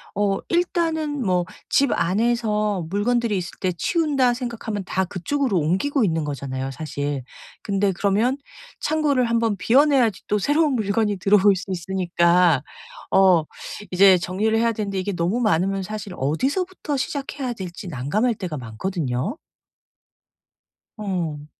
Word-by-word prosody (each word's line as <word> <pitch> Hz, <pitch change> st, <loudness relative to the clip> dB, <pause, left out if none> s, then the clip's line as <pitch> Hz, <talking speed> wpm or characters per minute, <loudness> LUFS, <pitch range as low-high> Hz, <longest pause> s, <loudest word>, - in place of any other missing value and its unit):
어 200 Hz, -1 st, +1 dB
일단은 325 Hz, -5 st, 0 dB
뭐 180 Hz, -2 st, +1 dB, 0.2 s
집 275 Hz, -2 st, +3 dB
안에서 210 Hz, 0 st, 0 dB
'물건들이 230 Hz, +1 st, +1 dB
있을 175 Hz, -2 st, -4 dB
때 185 Hz, -1 st, 0 dB
치운다.' 285 Hz, -, +2 dB
생각하면 230 Hz, -4 st, -4 dB
다 190 Hz, 0 st, 0 dB
그쪽으로 225 Hz, +5 st, -1 dB
옮기고 190 Hz, -, +1 dB
있는 165 Hz, -4 st, +1 dB
거잖아요, 135 Hz, -2 st, -4 dB
사실. 145 Hz, -1 st, -4 dB, 0.4 s
근데 200 Hz, -1 st, +1 dB
그러면 205 Hz, +8 st, +1 dB, 0.4 s
창고를 290 Hz, -4 st, +1 dB
한 230 Hz, -, -1 dB
번 225 Hz, -3 st, +1 dB
비워 245 Hz, +9 st, +5 dB
내야지 250 Hz, -9 st, +2 dB
또 210 Hz, -, +1 dB
새로운 295 Hz, -, +2 dB
물건이 210 Hz, -2 st, 0 dB
들어올 200 Hz, +1 st, +4 dB
수 185 Hz, -, -6 dB
있으니까 175 Hz, -3 st, +2 dB, 0.5 s
어 185 Hz, -4 st, +5 dB, 0.5 s
이제 190 Hz, 0 st, +6 dB
정리를 200 Hz, +5 st, 0 dB
해야 230 Hz, +1 st, +2 dB
되는데 205 Hz, -3 st, -3 dB
이게 200 Hz, +2 st, -2 dB
너무 180 Hz, +8 st, 0 dB
많으면 195 Hz, -1 st, +1 dB
사실 210 Hz, -1 st, -6 dB
어디서부터 285 Hz, -, -1 dB
시작해야 275 Hz, -1 st, -3 dB
될지 185 Hz, -3 st, -7 dB
난감할 175 Hz, -, 0 dB
때가 175 Hz, -6 st, -5 dB
많거든요. 130 Hz, -, -3 dB, 1.6 s
어. 170 Hz, -8 st, -3 dB
200 Hz, 305 characters per minute, -23 LUFS, 175-245 Hz, 1.6 s, 이제